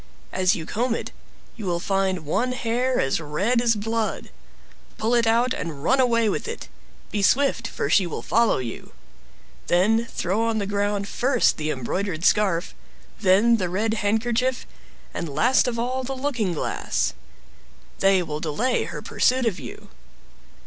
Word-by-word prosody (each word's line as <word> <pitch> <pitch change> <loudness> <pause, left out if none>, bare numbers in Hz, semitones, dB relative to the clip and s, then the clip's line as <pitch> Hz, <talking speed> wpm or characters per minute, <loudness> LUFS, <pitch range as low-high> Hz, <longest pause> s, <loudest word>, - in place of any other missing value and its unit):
As 185 +3 +2
you 160 - -5
comb 230 +5 -1
it, - - -5 0.4
you 215 -5 -6
will 170 -1 0
find 190 -3 -1
one 250 +12 0
hair 250 +1 0
as 135 +4 0
red 195 +11 0
as 235 -2 +3
blood; 225 +1 -2 0.7
pull 225 +2 0
it 235 -1 +3
out, 240 +3 +3
and 150 -4 -5
run 265 +10 +3
away 230 -3 +3
with 205 - -2
it. - - -6 0.4
Be 205 - -1
swift, 250 +1 +2
for - - -3
she 180 +4 +3
will 170 - -5
follow 230 0 +2
you. 120 -3 -6 0.7
Then 220 +6 +3
throw 195 -1 -2
on 230 -1 0
the 205 - -1
ground, 200 0 -1
first 250 +3 +2
the 155 0 -2
embroidered 165 +6 -2
scarf, 195 -5 +2 0.5
then 210 +4 +4
the 185 -4 -2
red 215 +5 0
handkerchief, 230 +4 0 0.5
and 170 - -4
last 235 - +3
of 240 -1 -2
all 255 +3 -2
the 265 +1 -4
looking 255 -8 -1
glass; - - -1 0.9
they 195 -2 +4
will 150 -2 -4
delay 170 - 0
her - - -7
pursuit 255 0 +1
of 220 -6 -1
you. - - -10
215 Hz, 160 wpm, -24 LUFS, 185-240 Hz, 0.9 s, then